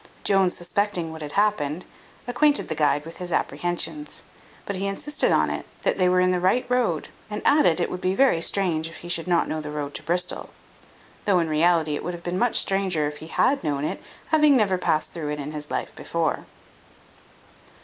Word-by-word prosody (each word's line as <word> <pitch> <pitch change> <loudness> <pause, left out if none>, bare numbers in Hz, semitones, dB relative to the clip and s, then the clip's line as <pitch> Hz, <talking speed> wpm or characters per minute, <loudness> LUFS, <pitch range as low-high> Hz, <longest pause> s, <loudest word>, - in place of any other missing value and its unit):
Jones 195 -2 +3
suspecting 175 -1 -1
what 160 0 -9
had 150 -1 -6
happened, 180 -6 0 0.4
acquainted 285 +4 +2
the - - 0
guide 145 -1 +1
with 165 0 -9
his 180 -1 -5
apprehensions; 175 - -2 0.4
but 200 - -3
he 195 +1 -2
insisted 295 +10 0
on - - +3
it, - - -4 0.2
that - - +1
they 180 -1 +4
were 180 0 +3
in 185 0 +3
the 180 - +1
right 190 +8 +2
road, 240 -11 0 0.2
and 210 - -4
added, 285 - +4
it 175 - +1
would 180 - -5
be 185 0 0
very 260 -10 +4
strange 165 -4 +1
if 170 - -11
he - - -7
should 170 0 0
not 175 -1 +2
know 155 - -3
the 150 - -6
road 145 -1 -4
to - - -5
Bristol; 175 +2 -1 0.8
though, 200 -3 +4
in 170 -2 +1
reality, 160 0 +3
it - - -5
would 180 - -3
have 170 - -12
been 180 +1 -2
much 245 -1 +2
stranger 190 -6 +1
if 150 0 -6
he 160 - -9
had 255 +8 +1
known 145 -2 -1
it, - - -4 0.3
having 300 -3 +5
never 195 -5 +2
past 155 -3 0
through 160 -4 -4
it 150 0 -3
in 145 +1 -5
his 150 -1 -6
life - - -3
before. 165 -2 -2
175 Hz, 210 wpm, -24 LUFS, 155-200 Hz, 0.8 s, having